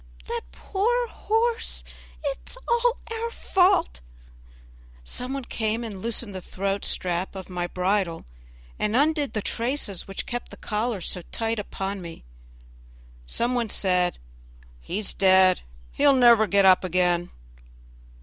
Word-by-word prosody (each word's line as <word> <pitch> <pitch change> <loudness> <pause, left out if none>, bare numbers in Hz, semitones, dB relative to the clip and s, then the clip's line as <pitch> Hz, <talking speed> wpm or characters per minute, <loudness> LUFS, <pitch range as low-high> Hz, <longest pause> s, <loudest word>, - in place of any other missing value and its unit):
that - - -3
poor 470 - 0
horse! 455 +2 -1 0.4
it 280 -2 -2
is - - -3
all 475 0 +2 0.2
our 455 +1 -2
fault." 360 - +2 1.0
Some 250 - -3
one 275 -2 -4
came 220 +1 -1
and 205 -5 -6
loosened 230 -1 0
the 185 - -5
throat 195 +2 -2
strap 180 +2 -1
of 190 -1 -8
my 175 -1 -2
bridle, 180 -1 0 0.5
and 210 +1 0
undid 295 +1 +2
the 215 - -2
traces 230 -6 -2
which 195 - -4
kept 240 0 -5
the - - -11
collar 215 -1 -2
so 180 - -2
tight 225 -1 -1
upon 195 -1 -4
me. 170 -2 -9 1.0
Some 240 - 0
one 240 -3 0
said, 180 -3 +1 0.6
"He's 195 - -3
dead, 190 -1 +5 0.3
he'll 285 -1 +4
never 235 -4 +6
get 200 +1 +4
up 185 0 +6
again." 175 -1 +1
210 Hz, 135 wpm, -25 LUFS, 185-265 Hz, 1.0 s, never